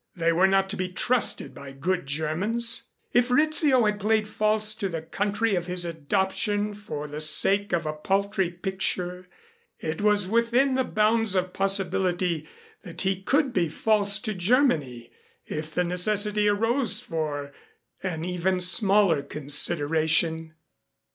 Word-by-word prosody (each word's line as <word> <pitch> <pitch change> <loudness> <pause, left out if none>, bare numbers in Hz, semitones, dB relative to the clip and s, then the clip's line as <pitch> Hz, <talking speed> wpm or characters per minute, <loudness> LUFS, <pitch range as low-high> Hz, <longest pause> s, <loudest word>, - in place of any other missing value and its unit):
They 170 -2 0
were 185 +3 +3
not 195 0 +1
to - - -2
be 185 -1 -4
trusted 240 +6 0
by 140 -1 -11
good 175 +4 -3
Germans. 180 +11 -1 0.2
If 245 +1 +2
Rizzio 290 -2 +3
had 210 -1 -1
played 215 +1 0
false 215 0 0
to 210 -3 -4
the 165 -2 -6
country 205 +5 -2
of 175 -2 -2
his 180 -1 -1
adoption 190 +6 -2
for 175 -8 -7
the 150 +1 -7
sake 195 +6 +4
of 170 -3 -1
a 155 - -3
paltry 195 +3 -1
picture, 180 0 -3 0.5
it 160 +4 -5
was 205 -2 +3
within 235 +5 +1
the 260 0 +1
bounds 215 -2 +2
of 185 0 -1
possibility 185 -4 0 0.3
that 170 -1 -6
he 190 0 -1
could 275 +5 0
be 170 -4 0
false 205 +3 +2
to 215 -2 -3
Germany 175 - 0 0.3
if 155 +1 -6
the 180 - -1
necessity 210 +4 0
arose 225 +5 +1
for 145 -3 -5 0.5
an 170 -4 -4
even 180 +1 -1
smaller 190 -3 +4
consideration. 160 +2 +1
190 Hz, 140 wpm, -25 LUFS, 165-210 Hz, 0.5 s, sake